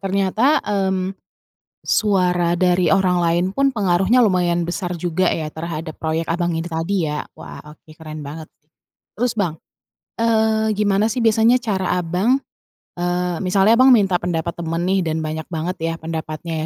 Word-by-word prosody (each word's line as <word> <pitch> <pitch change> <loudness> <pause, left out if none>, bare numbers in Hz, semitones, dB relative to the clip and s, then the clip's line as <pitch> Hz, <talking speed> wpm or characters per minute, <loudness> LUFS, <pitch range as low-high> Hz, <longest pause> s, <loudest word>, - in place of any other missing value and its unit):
ternyata, 200 +9 +1
mmm, 190 -2 -1 0.7
suara 180 -4 +1
dari 180 -1 +2
orang 185 -2 +3
lain 170 +1 +2
pun 275 0 +2
pengaruhnya 195 +1 +2
lumayan 175 -4 +1
besar 180 0 -3
juga 175 +2 0
ya 155 -2 -2
terhadap 160 0 -6
proyek 160 +1 -2
Abang 175 0 -1
ini 165 +1 -3
tadi 165 +1 -1
ya? 150 0 -3
Wah, - - -10
oke 150 +1 -16
keren 155 -1 -8
banget 155 +2 -8
sih. 150 - -45 0.5
Terus, 240 +2 0
Bang, 175 -7 -2 0.6
eee, 220 -1 +2
gimana 205 0 +2
sih 245 - -2
biasanya 225 +2 +4
cara 190 -5 -1
Abang, 185 +10 +1 0.6
eee, 175 0 -1
misalnya 195 +4 +4
Abang 260 +2 +6
minta 195 -5 +3
pendapat 170 -1 -2
teman 165 0 -3
nih 190 +1 +1
dan 160 0 -1
banyak 155 0 -4
banget 170 +2 -3
ya 165 0 -1
pendapatnya 160 0 -4
180 Hz, 155 wpm, -20 LUFS, 165-200 Hz, 0.7 s, Abang